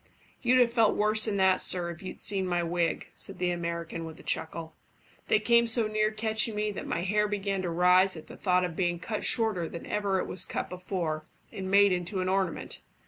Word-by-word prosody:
"You'd 255 0 +3
have 240 -2 +3
felt 225 -3 +3
worse 215 +1 +2
than 210 -3 -1
that, 190 -1 +3
sir, 175 -2 +2
if 170 - -11
you'd 190 - -8
seen 195 -2 0
my 175 -1 0
wig," 170 -1 -1
said - - -8
the 180 0 0
American, 170 -1 -4
with 160 -1 -9
a - - -13
chuckle. 160 0 -3 0.5
"They 435 - +3
came 235 0 +4
so 230 0 +5
near 215 0 +1
catching 220 0 +1
me 210 0 -1
that 200 - -7
my 170 - -2
hair 210 +3 +1
began 200 -2 -2
to 180 - -3
rise 180 +2 +3
at 155 - -10
the - - -11
thought 180 -1 +1
of 175 -2 -6
being 175 -1 0
cut 210 +5 -4
shorter 215 -8 +1
than 170 - -8
ever 200 -2 -1
it - - -1
was 185 - 0
cut - - -4
before, 175 -4 -4 0.3
and 190 -1 -5
made 200 0 +5
into 180 +2 -2
an 185 0 -1
ornament. 190 -3 -2
190 Hz, 220 wpm, -28 LUFS, 175-210 Hz, 0.5 s, so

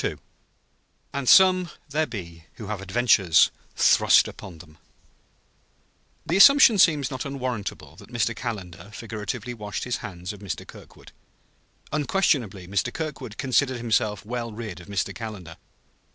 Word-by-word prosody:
II - - -1 1.0
"AND 140 -2 -1
SOME 185 -2 +6 0.2
THERE 155 +2 0
BE 85 -7 -9
WHO 110 - -10
HAVE 105 -3 -4
ADVENTURES 100 -4 +3 0.2
THRUST - - +5
UPON 90 -4 -10
THEM" 75 -2 -16 1.5
The 175 - 0
assumption 240 -2 +7
seems 150 -7 +3
not 130 -1 -4
unwarrantable, 130 -6 -5
that - - -15
Mr. 115 -1 -1
Calendar 100 -6 -7
figuratively 115 +2 -6
washed 105 -3 -6
his 125 - -2
hands 90 -4 -7
of 105 - -12
Mr. 100 -2 -6
Kirkwood. - - -15 0.8
Unquestionably 135 - 0
Mr. 100 +5 -1
Kirkwood 150 -9 -6
considered 130 0 +1
himself 110 -3 -1
well 120 0 -4
rid 105 -5 -7
of 90 - -15
Mr. 100 -2 -2
Calendar. 100 -8 -8
115 Hz, 135 wpm, -24 LUFS, 100-135 Hz, 1.5 s, assumption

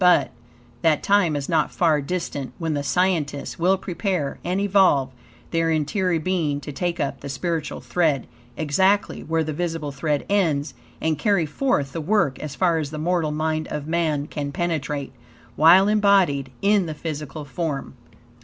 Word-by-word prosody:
But, 150 -8 +5 0.5
that 160 -3 +2
time 200 -6 +3
is 140 -1 -3
not 160 -3 +1
far 160 -4 +2
distant, 145 -4 -4
when 165 -3 -2
the 145 - -1
scientists 150 0 -1
will 185 +3 +3
prepare 180 -5 -2
and 180 +2 -1
evolve 190 -9 +3 0.4
their 165 -1 +1
interior 165 +3 +1
being 160 -4 0
to 145 - -7
take 170 +5 -2
up 140 - -2
the 140 - -7
spiritual 150 +3 -3
thread, 155 -8 +1 0.3
exactly 190 +7 +1
where 160 0 0
the 155 0 -3
visible 165 -2 -3
thread 145 +1 -1
ends, 160 -8 +1 0.3
and 160 -2 -1
carry 200 -4 +2
forth 145 - -1
the 165 - -3
work, 155 -6 +1
as 150 -3 -6
far 170 -3 +2
as 150 -3 -3
the 155 - -6
mortal 165 0 0
mind 155 +1 -1
of 150 -1 -4
man 155 -3 0
can 145 -1 -4
penetrate, 145 -4 -2 0.4
while 175 +7 +7
embodied 195 -10 +3
in 200 -3 +3
the 155 - -5
physical 150 -1 -6
form. 145 0 -4
160 Hz, 165 wpm, -23 LUFS, 145-180 Hz, 0.5 s, while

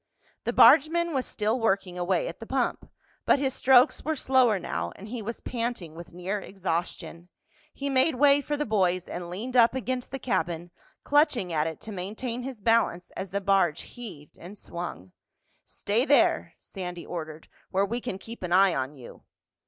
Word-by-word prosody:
The - - +1
bargeman 325 +3 +6
was 265 -2 -1
still 215 +3 -1
working 195 -5 0
away 180 - 0
at - - -7
the - - -9
pump, - - -1 0.3
but - - +4
his 270 -2 -1
strokes 255 -1 +4
were 315 0 -1
slower 255 -6 +3
now 85 - -3
and 205 - -10
he 240 0 -5
was 230 +2 -6
panting 230 -9 -4
with 170 +1 -10
near 180 +4 -3
exhaustion. 175 -2 -4 0.4
He 280 - -5
made 270 +2 +3
way 285 +2 +5
for 295 +1 -3
the 295 - -1
boys 185 -4 +1
and 175 0 -6
leaned 225 +8 -5
up 240 0 +5
against 255 -1 -3
the 270 - -4
cabin, 175 -9 -2 0.3
clutching 285 - +2
at 155 0 +1
it 160 - -6
to 220 - -7
maintain 215 +6 -4
his 255 -2 -7
balance 220 -5 +1
as 190 - -6
the 200 +2 -2
barge 190 -5 +2
heaved 205 - -11
and 190 +5 -10
swung. 170 - -7 0.5
"Stay 215 +4 -1
there," 285 +1 +3
Sandy 180 -3 -7
ordered, 160 -2 -7 0.2
"where 195 +1 +1
we 235 +4 -3
can 235 -6 -4
keep 230 +4 -10
an 180 -2 -4
eye 190 0 +5
on 135 +2 -3
you." 125 -4 -12
205 Hz, 180 wpm, -27 LUFS, 175-255 Hz, 0.5 s, bargeman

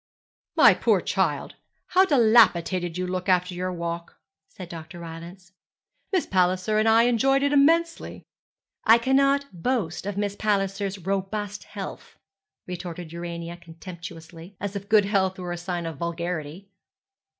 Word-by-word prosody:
'My - - +7
poor - - +2
child, - - -1 0.3
how 375 +1 +5
dilapidated 210 - +3
you 185 - -2
look 185 +1 -3
after 180 0 +2
your 180 +1 -3
walk,' 170 -1 -5 0.3
said 185 - -10
Dr. 165 0 -9
Rylance; 170 +2 -10 0.6
'Miss 375 -4 +1
Palliser 185 +3 +1
and 220 +1 +3
I 225 +1 +6
enjoyed 270 +3 +3
it 285 0 +2
immensely.' 330 +4 +2 0.6
'I 225 +1 +8
cannot 275 +3 +2 0.2
boast 200 -8 -1
of 205 -1 -4
Miss 205 -1 -1
Palliser's 200 -1 -1
robust 195 +2 -3
health,' 200 -2 -8 0.5
retorted 175 -2 -7
Urania 170 0 -6
contemptuously, 170 +1 -11
as 200 +1 -4
if 200 0 -6
good 215 -2 +5
health 190 -2 +1
were 180 -1 -5
a 175 - -3
sign 175 -1 -4
of 165 -3 -5
vulgarity. 170 +1 -4
185 Hz, 140 wpm, -25 LUFS, 170-215 Hz, 0.6 s, I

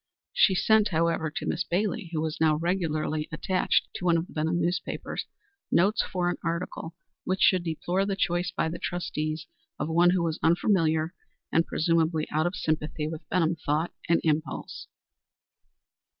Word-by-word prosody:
She 190 - +4
sent, 215 +3 +4
however, 165 -2 +1
to 155 - -5
Miss 170 - 0
Bailey, 205 +2 -1
who 160 -2 -1
was 160 -1 -3
now 155 -1 +4
regularly 155 -2 -1
attached 185 +4 +1
to 180 - -5
one 170 -1 +4
of 165 - -1
the - - -16
Benham 160 +3 0
newspapers, 175 +1 -2 0.4
notes 200 +6 +3
for 180 -2 -2
an 175 - 0
article 170 0 -3 0.3
which 185 0 -1
should 185 -2 +5
deplore 175 +3 -1
the 195 - 0
choice 175 -1 0
by - - -1
the 160 - -5
trustees 155 -3 -3 0.3
of - - -2
one 170 +2 +5
who 180 -1 +2
was 160 -2 -1
unfamiliar 165 -2 +2 0.4
and 165 +1 +2
presumably 160 -1 +1
out 155 +3 +2
of 180 - -3
sympathy 155 -2 -2
with 155 0 -7
Benham 170 -2 +1
thought 155 +4 0 0.2
and 170 - +4
impulse. 155 0 -2
170 Hz, 165 wpm, -27 LUFS, 160-180 Hz, 0.4 s, should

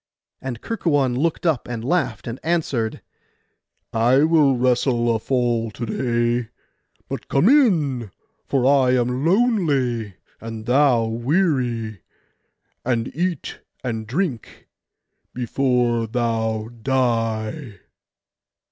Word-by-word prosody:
And 125 -3 -5
Kerkuon 145 - 0
looked 160 +6 -1
up 160 -7 +1
and 115 -1 -5
laughed, 135 -8 0
and 120 +2 -5
answered, 145 -9 -1 0.9
'I 120 +5 +4
will 155 -5 +4
wrestle 120 -1 +2
a - - -1
fall 120 -2 0
to 115 +2 -6
day; 120 0 0 0.6
but - - -6
come 140 +8 +3
in, 160 - +3 0.3
for 135 -3 0
I 130 -2 +4
am 125 +2 0
lonely 150 - +1 0.2
and 115 -1 -7
thou 125 -2 +3
weary, 120 - 0 0.8
and 120 -1 -1
eat 175 -2 -2 0.2
and 110 -3 -3
drink 135 - -3 0.7
before 125 -2 +1
thou 110 -2 -1
die. 115 - -1
125 Hz, 105 wpm, -22 LUFS, 115-145 Hz, 0.9 s, I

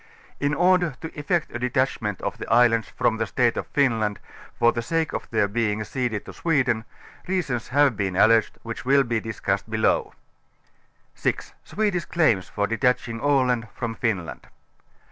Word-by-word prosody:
In 145 +1 0
order 175 -4 +3
to 160 - -7
effect 155 +3 -1
a 120 - -3
detachment 125 -5 -1
of - - -3
the - - -6
islands 115 -1 +4
from 110 - 0
the 110 -1 -1
State 120 0 +1
of - - -4
Finland, 115 -8 +1 0.4
for 120 -1 +4
the 120 - -3
sake 160 +6 -1
of - - -5
their 110 -3 +2
being 110 0 -1
ceded 110 -1 -3
to - - -9
Sweden, 130 -9 0 0.4
reasons 155 -11 -2
liave 140 -2 +3
been 95 -3 -1
alleged, 110 +3 +4
wliicli 115 0 -6
will 140 +1 +4
hu 115 -3 -1
discussed 100 -2 -3
below. 110 0 +1 1.0
6) - - -2
Swedish 205 -5 -1
Claims 120 - +1
for 100 - -1
Detaching 115 +1 0
Aland 125 -4 +1
from 120 -2 -3
Finland. 100 -8 -3
120 Hz, 160 wpm, -24 LUFS, 110-140 Hz, 1.0 s, islands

